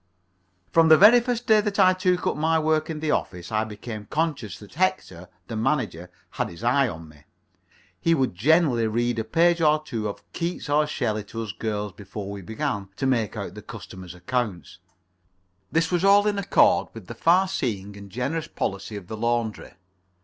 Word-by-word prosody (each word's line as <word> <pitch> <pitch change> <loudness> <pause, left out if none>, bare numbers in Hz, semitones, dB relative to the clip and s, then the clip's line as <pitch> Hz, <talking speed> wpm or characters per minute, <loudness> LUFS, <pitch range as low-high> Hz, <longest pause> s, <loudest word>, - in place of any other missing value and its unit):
From 165 -1 +5
the 155 - +9
very 220 +7 +8
first 240 0 -2
day 220 -3 +5
that 205 -1 -3
I 185 -2 +6
took 185 -1 0
up - - +1
my 160 +2 +2
work 155 0 +1
in 155 -2 -4
the 155 -1 0
office 90 - -3
I 110 0 +1
became 105 0 -8
conscious 150 - -2
that 105 - -14
Hector, 135 - -1 0.2
the 115 - -6
manager, 110 - -1 0.2
had - - -2
his 85 +6 -11
eye 135 +4 +3
upon 85 -6 -7
me. 75 -1 -18 0.8
He 165 0 +3
would 130 - 0
generally 125 - +3
read 120 +1 0
a - - -1
page 170 +9 +2
or 155 -1 +4
two 115 -8 -3
of 100 - -7
Keats 170 -2 -4
or 150 +1 +3
Shelley 110 -8 -2
to 115 +3 -5
us 105 - -5
girls, 105 0 -3
before 100 +1 -7
we 100 -1 -7
began 100 0 -3
to 135 - -3
make 115 -6 0
out 100 -4 -5
the 105 - -9
customers' 95 -5 -10
accounts. 95 -3 -3 0.9
This 165 +1 +1
was 175 0 +1
all 200 +1 +6
in 205 -1 +1
accord 200 - +3
with 110 -4 -9
the 115 - -8
far 175 +10 +3
seeing 105 - -3
and 100 0 -11
generous 140 +10 -3
policy 100 +2 -4
of 100 -3 -7
the 110 - -6
laundry. 115 -1 -2
120 Hz, 195 wpm, -25 LUFS, 105-165 Hz, 0.9 s, the